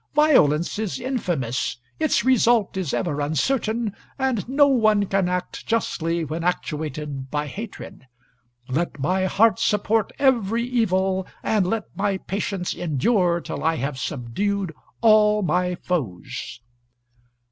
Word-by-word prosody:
Violence 205 - +4
is 215 -4 -2
infamous; 175 - -2 0.2
its 310 -6 +2
result 240 -5 +3
is 185 -7 -2
ever 150 -5 -1
uncertain, 220 - 0 0.2
and 260 -6 -1
no 285 +2 +5
one 215 -6 +3
can 195 -2 +1
act 180 0 -4
justly 170 -7 0
when 160 +3 -4
actuated 150 -5 -3
by 150 +1 -1
hatred. 195 - -8 0.6
Let 150 +3 -2
my 185 +7 +1
heart 220 +4 +3
support 210 +1 +1
every 235 -5 +2
evil, 190 -6 0 0.2
and 205 -4 +1
let 220 +2 -1
my 200 -1 0
patience 195 -1 -3
endure 175 - +1
till - - -6
I 160 +1 +2
have 135 -1 -3
subdued 165 - -2 0.3
all 210 -2 +5
my 180 0 +1
foes." 130 - -4
190 Hz, 125 wpm, -23 LUFS, 160-225 Hz, 0.6 s, no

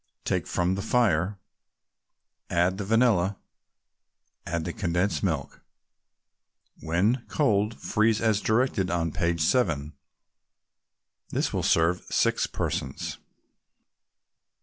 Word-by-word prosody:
Take - - -1
from 90 +1 0
the 95 - -2
fire, 100 -5 +1 1.1
add 90 +3 +1
the - - -2
vanilla 105 -4 +2 1.1
and 85 -1 -2
the 85 - -3
condensed 90 +1 0
milk. 80 -8 -2 1.2
When 100 +10 +1
cold, 110 -6 +1
freeze 110 0 +1
as 110 -2 +1
directed 110 -4 +1
on 85 -2 0
page 85 -1 -1
7. 80 - +1 1.4
This - - -1
will - - 0
serve 85 +2 +2
six - - +1
persons. 65 - -4
95 Hz, 100 wpm, -26 LUFS, 85-110 Hz, 1.4 s, vanilla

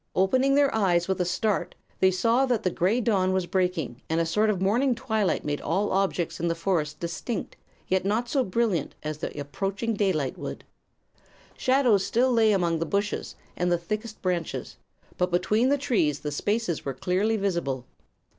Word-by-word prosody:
Opening 260 +9 +3
their 285 -1 +3
eyes 180 -5 +2
with 190 -1 0
a - - +1
start 195 +4 -1 0.2
they 190 - +5
saw 230 +8 +2
that 245 -4 0
the 185 - +1
gray 190 +9 +1
dawn 190 -5 +2
was 190 -1 0
breaking 175 - -1
and 160 +1 +1
a 165 - +2
sort 210 +6 +2
of 200 -4 0
morning 240 +7 +2
twilight 220 -4 -1
made 145 -1 -2
all 190 +7 0
objects 190 -3 0
in 170 - 0
the 165 - 0
forest 165 -3 -1
distinct, 170 +6 -4 0.3
yet 190 0 +1
not 215 +5 0
so 265 +2 +1
brilliant 200 - 0
as 155 0 -4
the - - -5
approaching 195 +10 -2
daylight 185 -10 0
would. - - -6 0.9
Shadows 255 -7 +3
still 250 +5 +2
lay 225 -2 +4
among 170 -4 +1
the 165 - -1
bushes 200 +1 -2 0.2
and 180 0 0
the 175 - +3
thickest 215 +6 -5
branches; 175 -3 -2 0.4
but 180 0 +2
between 215 +8 +2
the 285 - +3
trees 210 - 0
the 150 - -3
spaces 205 +2 -1
were 135 -2 -4
clearly 195 - +1
visible. 170 - -1
190 Hz, 180 wpm, -26 LUFS, 170-220 Hz, 0.9 s, they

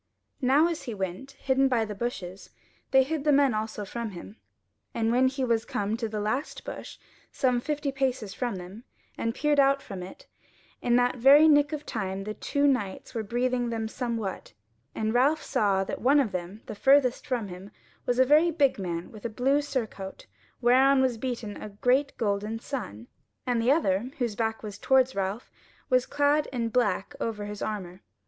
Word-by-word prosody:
Now 275 +5 +4
as 335 -2 -4
he 235 - -5
went, 190 +8 -5
hidden 270 0 +1
by 240 -4 +1
the 210 - -5
bushes, 195 -4 -5 0.4
they 265 0 +5
hid 300 +1 -3
the 300 - +3
men 280 -3 +4
also 215 -1 -3
from 235 +3 -4
him, 200 +3 -10 0.6
and 225 0 +1
when 255 +2 +4
he 265 +1 -2
was 230 -2 +1
come 205 +1 -2
to 230 -2 -3
the 215 0 -3
last 220 +8 -3
bush, - - -7 0.3
some 250 -3 +1
fifty 295 0 -2
paces 260 -6 -2
from 245 -5 -2
them, 185 +5 -9 0.3
and 230 0 -2
peered 295 -1 +2
out 275 0 +4
from 195 -9 -8
it, 180 +1 -10 0.6
in 240 -1 +2
that 245 +1 +2
very 280 +6 +7
nick 290 -1 +5
of 300 -1 -5
time 195 -3 -3
the 215 +1 -4
two 285 +6 -1
knights 250 -9 0
were 230 - -2
breathing 245 +2 -1
them 225 -1 -2
somewhat, 225 - -4 0.4
and 220 0 -1
Ralph 280 +6 +3
saw 195 -2 +1
that - - -5
one 275 +5 +5
of 250 -7 +1
them, 185 +3 -6
the - - -6
furthest 265 +3 +3
from 235 -6 -2
him, 185 +2 -9 0.4
was 245 - +1
a 260 - +5
very 305 +5 +5
big 285 -8 +2
man 170 -2 -4
with 215 -2 -12
a 235 - -2
blue 265 +6 +1
surcoat 225 -9 -5 0.4
whereon 265 +3 +5
was 245 -3 0
beaten 235 -5 -4
a 215 - -6
great 255 +7 +1
golden 210 +1 -1
sun, 225 - -6 0.4
and 245 -2 +1
the 240 +3 +3
other, 235 - +1
whose 235 -5 -1
back 225 0 -2
was 205 -1 -7
towards 260 -1 +3
Ralph, 195 +4 -3 0.4
was 255 0 +3
clad 290 +1 +2
in 235 -3 -1
black 210 -6 0
over 210 -2 -3
his 205 0 -7
armour. 190 -3 -5
240 Hz, 190 wpm, -27 LUFS, 210-270 Hz, 0.6 s, very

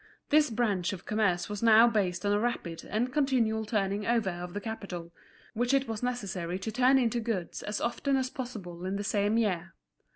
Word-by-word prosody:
This 300 -1 +5
branch 210 -6 0
of 185 - -8
commerce 210 -5 +1
was 205 -1 -5
now 230 0 +7
based 195 -5 0
on 205 - +2
a 205 - +2
rapid 195 -8 -3
and 240 +5 -1
continual 245 -7 +1
turning 205 -2 -1
over 230 -5 +2
of 175 +1 -7
the - - -1
capital, 195 -6 -6 0.4
which 245 +4 +1
it 275 0 +1
was 225 -2 -4
necessary 200 -8 -2
to 195 +4 -4
turn 255 +4 +4
into 240 -2 +1
goods 220 -7 -3
as 210 0 -3
often 270 +3 0
as 260 -1 -1
possible 195 -9 -7
in 190 - -2
the 205 - -2
same 205 +2 +1
year. 190 -5 0
215 Hz, 195 wpm, -29 LUFS, 190-240 Hz, 0.4 s, now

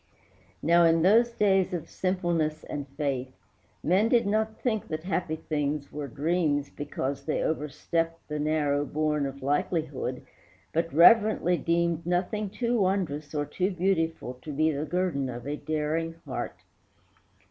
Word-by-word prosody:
Now, 170 +2 +5
in 165 -1 +4
those 225 +6 +5
days 195 -5 +2
of 165 - -5
simpleness 175 -4 -1
and 145 -1 -5
faith, 135 -3 -1 0.5
Men 195 +6 +3
did 235 -1 +4
not 220 +2 0
think 220 -4 -1
that 155 0 -4
happy 180 -3 -1
things 150 -2 -2
were 145 -1 -5
dreams 145 0 0
Because 140 -1 -4
they 155 - 0
overstepped 165 +2 -2
the 150 0 -3
narrow 145 -1 +1
bourne 150 -1 0
Of 135 0 -8
likelihood, 145 0 -1 0.5
but 165 +1 0
reverently 180 +2 +6
deemed 170 -1 0
Nothing 190 +4 0
too 235 +3 0
wondrous 175 -6 -1
or 145 0 0
too 185 +5 -1
beautiful 165 -8 -1
To 155 - -7
be 155 +3 +2
the 145 +1 -2
guerdon 155 -5 -1
of 120 -1 -7
a 145 +1 -2
daring 155 +2 -2
heart. 130 -3 -4
160 Hz, 145 wpm, -28 LUFS, 145-180 Hz, 0.5 s, reverently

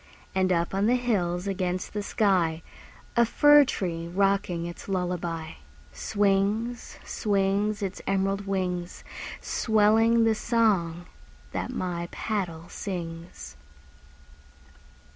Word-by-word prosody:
And 185 -1 +2
up 170 0 +1
on 195 +2 +2
the 245 - +4
hills 190 -8 0
against 185 -2 -2
the 210 - -2
sky, 180 -6 +1 0.5
A 235 - +6
fir 290 +5 +6
tree 170 -9 -3
rocking 190 -2 +1
its 175 +3 -8
lullaby, 175 -3 -2 0.4
Swings, 205 +4 0
swings, 205 +1 0
Its 195 -1 -4
emerald 195 +1 0
wings, 180 -2 -2 0.4
Swelling 225 +1 +3
the 225 0 +4
song 200 -8 +1 0.5
that - - -3
my 175 -7 -3
paddle 175 -7 -3
sings. 165 - -6
195 Hz, 105 wpm, -27 LUFS, 175-215 Hz, 0.5 s, A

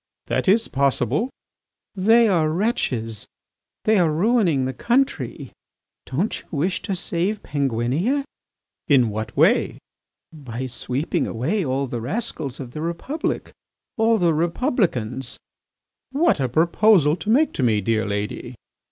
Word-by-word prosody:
"That - - -1
is 220 +4 +4
possible." 140 - +1 0.6
"They 225 +4 +4
are 165 -6 +2
wretches; 130 - -1 0.6
they 215 -2 +3
are 165 -3 +3
ruining 175 - +2
the 130 - -2
country. 255 - -1 0.6
Don't 170 +12 -1
you - - -26
wish 170 +4 -1
to 195 - -3
save 185 +3 -2
Penguinia? 140 - 0 0.6
"In 125 -7 +4
what 110 +1 -5
way?" - - +3 0.6
"By 130 -5 -6
sweeping 130 +4 -2
away 155 - -1
all 135 -1 -1
the 120 -3 -4
rascals 140 - -3
of 130 -3 -7
the 150 - -6
Republic, 170 - -3 0.4
all 225 -1 +3
the 175 -4 +2
Republicans." 160 - -1 0.7
"What 300 - +2
a 130 -2 0
proposal 165 - +4
to 175 +5 -6
make 285 +8 +3
to - - -3
me, 115 -4 +3
dear 110 +2 0
lady!" 105 +4 -4
155 Hz, 130 wpm, -22 LUFS, 125-210 Hz, 0.7 s, is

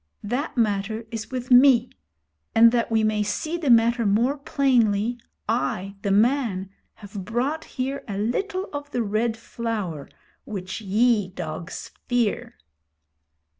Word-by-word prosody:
That 255 +7 -3
matter 220 0 0
is 225 -2 -5
with 255 -1 -5
me; 250 -1 +6 0.6
and 230 +1 +8
that 235 -1 0
we 220 -1 +2
may 215 -1 +1
see 310 +11 -2
the 330 -5 -2
matter 235 0 +5
more 225 +7 +2
plainly, 245 -6 +1 0.3
I, 200 -4 -1
the 200 - -1
man, 210 -3 +2 0.2
have 205 -1 -8
brought 255 +10 -2
here 270 +2 -4
a 200 -2 -4
little 370 - -1
of 290 0 -5
the 245 -4 -1
Red 220 +2 0
Flower 215 -10 -4 0.3
which 190 0 -6
ye, 210 0 +2
dogs, 170 -1 -6 0.2
fear.' 240 -4 0
230 Hz, 130 wpm, -24 LUFS, 205-250 Hz, 0.6 s, and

